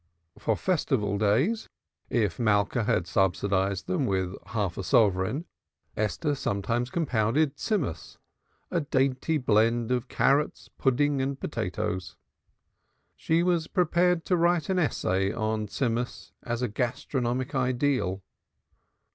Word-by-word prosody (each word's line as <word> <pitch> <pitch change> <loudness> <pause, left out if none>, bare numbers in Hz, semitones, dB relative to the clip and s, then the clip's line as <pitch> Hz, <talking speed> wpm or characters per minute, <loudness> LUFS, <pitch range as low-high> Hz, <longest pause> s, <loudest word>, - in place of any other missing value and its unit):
For - - +1
Festival 120 - 0
days, 130 - +1 0.4
if 105 -8 0
Malka 110 +1 +2
had 110 -6 +1
subsidized 95 0 +1
them 175 -8 0
with 95 -2 -1
a 95 -1 -13
half 100 -4 -2
sovereign, 100 - +2 0.5
Esther 125 +9 -1
sometimes 120 0 -1
compounded 135 -1 +1
Tzimmus, 150 - -2 0.5
a 170 - +1
dainty 135 +2 +1
blend 115 -1 +2
of 125 0 0
carrots, 140 +4 +1
pudding 140 +1 +2
and 135 +1 -2
potatoes. 105 - -3 1.0
She 165 +1 +1
was 175 -3 +1
prepared 180 -1 +2
to 185 - +2
write 170 -1 +2
an 190 -1 +2
essay 95 - +1
on 110 -1 -2
Tzimmus 120 +2 -2
as 120 0 -3
a - - +2
gastronomic 125 +2 -2
ideal. 130 -7 0
120 Hz, 115 wpm, -27 LUFS, 105-145 Hz, 1.0 s, Malka